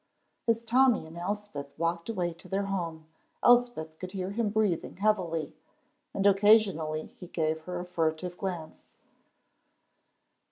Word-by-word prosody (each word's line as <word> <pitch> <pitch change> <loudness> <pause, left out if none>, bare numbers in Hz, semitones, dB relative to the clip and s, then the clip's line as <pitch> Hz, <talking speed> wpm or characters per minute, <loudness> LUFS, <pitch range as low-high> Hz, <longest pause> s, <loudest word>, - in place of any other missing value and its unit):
As 230 0 +2
Tommy 245 -5 +4
and 160 +1 -12
Elspeth 175 -6 -5
walked 170 +3 -1
away 180 -6 -1
to 170 - -14
their 195 +1 0
home, 170 -5 -3 0.4
Elspeth 240 -11 +3
could 185 0 -7
hear 190 -1 -3
him 220 0 0
breathing 205 -7 0
heavily, 185 -6 0 0.6
and 195 - -2
occasionally 195 -6 +4
he 180 - -8
gave 160 -2 -1
her 180 -1 -4
a 175 - -5
furtive 175 0 -1
glance. 175 -5 -5
180 Hz, 130 wpm, -29 LUFS, 165-205 Hz, 0.6 s, Tommy